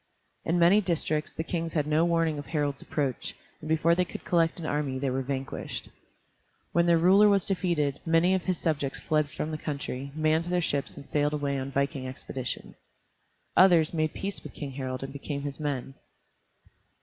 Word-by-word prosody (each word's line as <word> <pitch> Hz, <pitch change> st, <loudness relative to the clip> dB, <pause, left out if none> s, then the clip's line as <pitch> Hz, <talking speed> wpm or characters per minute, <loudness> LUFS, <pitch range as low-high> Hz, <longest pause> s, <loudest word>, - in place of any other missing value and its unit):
In 165 Hz, -, +1 dB
many 175 Hz, +5 st, +6 dB
districts 155 Hz, -4 st, -1 dB
the 160 Hz, -, -4 dB
kings 165 Hz, -1 st, -3 dB
had 150 Hz, -3 st, +1 dB
no 155 Hz, +2 st, +3 dB
warning 165 Hz, -3 st, +1 dB
of 145 Hz, -, -8 dB
Harald's 145 Hz, -3 st, -1 dB
approach, 140 Hz, -5 st, -2 dB, 0.2 s
and 155 Hz, -, -8 dB
before 160 Hz, +1 st, +3 dB
they 180 Hz, +2 st, +3 dB
could -, -, -8 dB
collect 165 Hz, -1 st, +2 dB
an 165 Hz, -, -5 dB
army 145 Hz, -3 st, -1 dB
they 135 Hz, 0 st, -1 dB
were 130 Hz, +1 st, 0 dB
vanquished. 135 Hz, 0 st, -4 dB, 0.8 s
When 170 Hz, 0 st, +3 dB
their 170 Hz, -1 st, +5 dB
ruler 195 Hz, +5 st, +6 dB
was 200 Hz, -2 st, +3 dB
defeated, 170 Hz, -7 st, 0 dB
many 165 Hz, +3 st, +3 dB
of 190 Hz, -2 st, 0 dB
his 185 Hz, -2 st, 0 dB
subjects 150 Hz, -5 st, -1 dB
fled 155 Hz, -2 st, +1 dB
from 155 Hz, +1 st, -4 dB
the 155 Hz, -, -4 dB
country, 140 Hz, -2 st, -4 dB
manned 155 Hz, +1 st, +2 dB
their 180 Hz, 0 st, +1 dB
ships 145 Hz, -4 st, -1 dB
and 140 Hz, -, -9 dB
sailed 145 Hz, +1 st, 0 dB
away 140 Hz, -2 st, -1 dB
on 135 Hz, +1 st, -4 dB
viking 140 Hz, -1 st, -1 dB
expeditions. 130 Hz, 0 st, -5 dB, 0.8 s
Others 175 Hz, -4 st, +6 dB
made 155 Hz, -2 st, 0 dB
peace 200 Hz, +1 st, -1 dB
with -, -, -10 dB
King 145 Hz, -3 st, -5 dB
Harald 130 Hz, -1 st, -4 dB
and 135 Hz, 0 st, -6 dB
became 140 Hz, 0 st, -4 dB
his 145 Hz, 0 st, -4 dB
men. 140 Hz, -3 st, -3 dB
155 Hz, 185 wpm, -28 LUFS, 140-170 Hz, 0.8 s, many